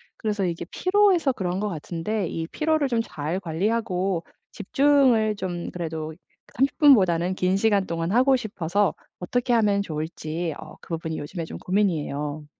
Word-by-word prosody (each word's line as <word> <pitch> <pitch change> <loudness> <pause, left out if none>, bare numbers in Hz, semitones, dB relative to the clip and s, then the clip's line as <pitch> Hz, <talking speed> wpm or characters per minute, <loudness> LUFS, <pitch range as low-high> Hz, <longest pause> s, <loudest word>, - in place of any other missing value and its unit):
그래서 210 -3 -1
이게 170 -1 -3
피로해서 370 -7 +3
그런 185 -4 -2
것 210 - -1
같은데 175 +3 -3
이 165 0 -4
피로를 310 - +1
좀 235 -2 +1
잘 165 -3 -4
관리하고 190 0 -1 0.3
집중을 245 -2 +3
좀 180 -3 -4
그래도 160 -2 -4 0.4
30 270 +2 +1
분보다는 185 - +5
긴 185 +1 +1
시간 200 -2 +2
동안 165 +1 -2
하고 260 +3 +4
싶어서 205 -4 0 0.3
어떻게 245 +7 -1
하면 210 -4 +3
좋을지 160 -1 -4
어 - - -11
그 - - -9
부분이 160 -1 -4
요즘에 165 +4 -5
좀 160 - -7
고민이에요. 155 -6 -1
190 Hz, 325 characters per minute, -24 LUFS, 165-230 Hz, 0.4 s, 분보다는